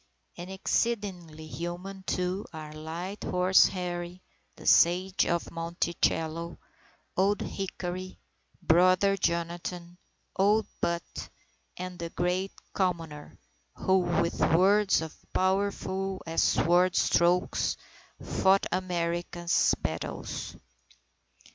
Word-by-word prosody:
And 175 +1 -8
exceedingly 190 -5 -2
human, 175 +4 -6
too, 185 +2 -1
are 155 -1 -8
Light 165 +6 -6
Horse 180 +1 +5
Harry, 180 -1 -5 0.3
the - - -13
Sage 185 +3 +4
of 170 0 -1
Monticello, 165 0 -1 0.6
Old 200 +2 +2
Hickory, 185 -1 -5 0.5
Brother 185 +4 +4
Jonathan, 175 0 -3 0.4
Old 210 +3 +3 0.2
Put, 170 0 -3 0.5
and 180 0 -6
the 170 0 -4
Great 180 +3 -1 0.2
Commoner, 165 -6 -2 0.4
who, 190 0 +2
with 175 -1 0
words 190 +1 +4
as 160 - -8 0.2
powerful 190 0 0
as 165 0 0
sword 175 +2 +3
strokes, 175 +1 +2 0.4
fought 190 +1 +2
America's 175 -1 0
battles. - - -4
180 Hz, 90 wpm, -29 LUFS, 170-190 Hz, 0.6 s, Horse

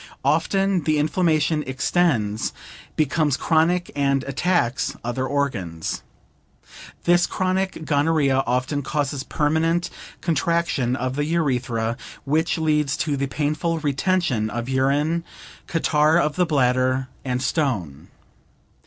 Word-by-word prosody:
Often 195 -4 +1
the 155 -1 +2
inflammation 155 -1 +1
extends, 130 -6 0 0.4
becomes 150 -1 +1
chronic 175 +2 +1
and 140 -1 +1
attacks 140 -3 0
other 120 +2 -2
organs. 95 - -2 1.0
This 175 0 +4
chronic 185 -2 -1
gonorrhea 145 -3 +2
often 130 +4 0
causes 140 -1 -2
permanent 165 +4 0 0.3
contraction 165 -6 0
of 130 +1 -2
the 145 - +1
urethra, 125 -8 0 0.3
which 160 +5 +1
leads 150 -3 +1
to 150 -3 0
the 140 0 -1
painful 155 +4 -1
retention 145 - 0
of 120 +2 -4
urine, 140 +5 +1 0.4
catarrh 155 -1 +3
of 150 -3 +1
the 180 -1 +2
bladder, 130 -2 +2 0.2
and 125 -2 -1
stone. 120 - -2
145 Hz, 110 wpm, -23 LUFS, 130-165 Hz, 1.0 s, This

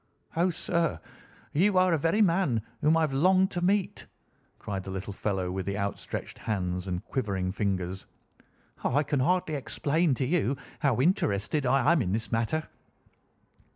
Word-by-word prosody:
"Oh, 175 +3 +3
sir, 170 -1 -1 0.5
you 190 +5 +3
are 185 0 +5
the 165 - +3
very 165 +9 +3
man 165 - +2 0.2
whom 155 +2 +4
I - - +2
have 155 -4 0
longed 185 +7 +4
to 175 - -3
meet," 195 +2 0 0.5
cried 95 -2 -5
the 95 - -8
little 95 +1 -5
fellow 95 -3 -2
with 95 +1 -3
outstretched 100 0 -4
hands 90 -4 -2
and 90 -1 -3
quivering 100 -8 -2
fingers. 95 -2 -2 0.8
"I 145 +4 +2
can 145 -1 -1
hardly 160 +4 +1
explain 150 +2 0
to 130 - -1
you 140 -3 +1 0.2
how 135 -5 +2
interested 135 - +1
I 135 +3 +4
am 170 -4 +3
in 95 -4 -1
this 110 +1 -2
matter." 115 +7 0
135 Hz, 155 wpm, -28 LUFS, 100-165 Hz, 0.8 s, are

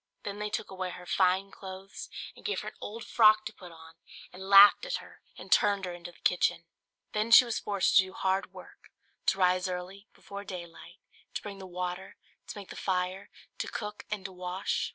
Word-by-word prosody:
Then 205 0 -5
they 210 0 -2
took 215 -1 -4
away 185 -1 -4
her 180 0 -9
fine 185 +2 +2
clothes, 190 +1 -9 0.3
and - - -16
gave 420 - -1
her - - -5
an - - -21
old 225 +2 -6
frock 215 -1 +5
to 220 - -5
put 180 -4 -12
on, 160 0 -15 0.4
and 190 +1 -8
laughed 200 - +9
at - - -2
her - - -10 0.2
and - - -11
turned 200 -2 +4
her 180 - -5
into 175 0 -9
the - - -22
kitchen. 180 -1 +2 0.5
Then 215 +2 0
she 230 +2 +9
was 235 - -2
forced 200 -3 +2
to 190 - +8
do 190 - -11
hard 190 -1 -1
work; 185 -1 -14 0.4
to 190 - +3
rise 185 0 +2
early, 185 +3 -6
before 200 0 -9
daylight, 175 -4 -9 0.3
to - - -2
bring 200 -2 -7
the 190 - -8
water, 180 +1 -5 0.3
to - - -7
make 200 -2 -9
the - - -8
fire, 185 +1 -2 0.3
to - - -2
cook 210 -1 -6
and 210 -2 -4
to 190 - -5
wash. 180 +1 -2
190 Hz, 210 wpm, -30 LUFS, 180-205 Hz, 0.5 s, laughed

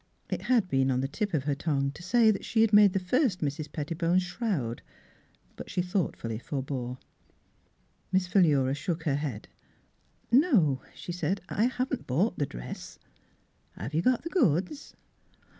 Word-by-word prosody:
It - - -2
had 235 -7 +2
been 135 -5 +2
on 130 -1 +1
the 135 - -1
tip 205 +8 -3
of 140 - 0
her 145 +1 0
V>ngue 140 -1 -1
to 175 - -12
say 220 +4 +4
that 195 - -3
she 220 - +1
had 225 -1 +3
made 205 -2 +7
the 195 - +1
first 200 - +1
Mrs. 145 0 -3
Pettibone's 165 +4 0
shroud; 180 - -2 0.7
but - - -9
she 180 - -1
thoughtfully 170 - -2
forbore. 130 -2 -4 1.1
Miss 190 -1 +2
Philura 150 -8 +3
shook 165 +2 -3
her 145 -4 +1
head. 135 -8 -4 0.5
" - - -39
No," 230 - +4
she - - -7
said, 180 +2 -1
" - - -34
I 215 - +1
haven't 255 +1 -2
bought 180 - +1
the 145 - +1
dress." - - -8 0.4
" - - -41
Have 115 - -6
you 160 - +2
got 250 +5 +2
the 335 - -4
goods? 240 - 0
170 Hz, 175 wpm, -28 LUFS, 140-205 Hz, 1.1 s, made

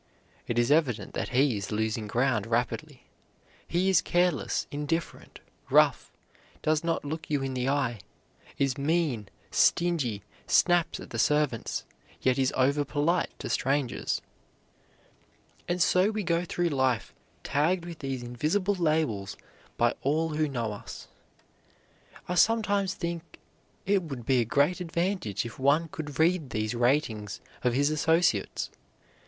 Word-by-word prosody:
It 120 - -2
is 120 +3 +3
evident 125 - +1
that - - -3
he 130 -1 +3
is 100 +1 -5
losing 110 0 -1
ground 115 -1 +1
rapidly. 125 +3 -2 0.6
He 180 +3 +1
is 190 - +5
careless, 175 -4 +1
indifferent, 150 +3 -4 0.3
rough, - - +4 0.5
does 155 +1 +2
not 165 -2 -1
look 160 +3 -5
you 145 -2 0
in 135 -1 -3
the 130 +1 -1
eye, 130 -6 0 0.6
is 140 0 0
mean, 145 - 0 0.2
stingy, 145 - +2 0.2
snaps 175 -2 +3
at - - -10
the - - -3
servants, 150 -6 +1 0.3
yet 130 0 +1
is 130 0 +2
over 140 +3 +3
polite 150 +5 0
to - - -6
strangers. 135 -2 -1 1.4
And 175 +1 -1
so 185 +3 +4
we 215 -1 -2
go 170 0 0
through 175 0 0
life, 130 -5 0 0.3
tagged 170 +5 +1
with 170 -2 -8
these 135 -3 -4
invisible 155 +12 0
labels 155 - 0 0.4
by 120 0 +3
all 155 +4 +1
who 155 -1 0
know 115 -5 -2
us. 100 - -9 1.2
I 180 - -1
sometimes 205 -1 +2
think 170 -1 -5 0.5
it 195 0 +3
would 135 -8 -7
be 130 0 +3
a 120 - +2
great 145 +10 +2
advantage 170 - -1
if 115 - -8
one 145 +5 +3
could 150 -3 -6
read 160 -3 +2
these 110 +1 -2
ratings 120 -5 0 0.2
of 125 -2 +2
his 145 +3 +2
associates. 160 - +1
145 Hz, 140 wpm, -28 LUFS, 125-170 Hz, 1.4 s, is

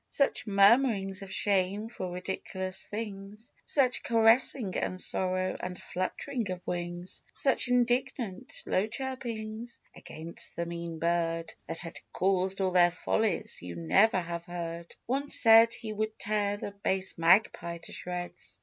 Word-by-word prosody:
Such 275 -4 +1
murmurings 200 -1 +4
of 195 -1 -8
shame 200 +2 +1
for 190 -5 -5
ridiculous 185 +1 -4
things; 210 0 -7
Such 260 -4 +2
caressing 225 -2 +3
and 185 - -2
sorrow, 185 0 0
and 180 -1 -5
flutt'ring 220 +5 -3
of 185 -1 -3
wings; 175 +1 -4
Such 270 -3 +2
indignant, 245 -4 0
low 190 +3 +1
chirpings 235 -2 -5 0.2
against 165 +2 -5
the 170 - -2
mean 170 -1 -5
bird 165 0 0
That 165 - -2
had 165 -3 -6
caused 190 0 +1
all 190 -1 +1
their 175 -1 +6
follies, 200 +2 -1
you 90 0 -7
never 90 - +3
have 170 -1 -5
heard! 170 -1 -6
One 275 +4 -1
said 225 0 +7
he 225 -2 -4
would 215 +1 -3
tear 205 -1 0
the 205 - -5
base 190 -1 -2
Magpie 170 -1 +3
to - - -9
shreds. 180 0 -5
195 Hz, 140 wpm, -29 LUFS, 175-225 Hz, 0.2 s, said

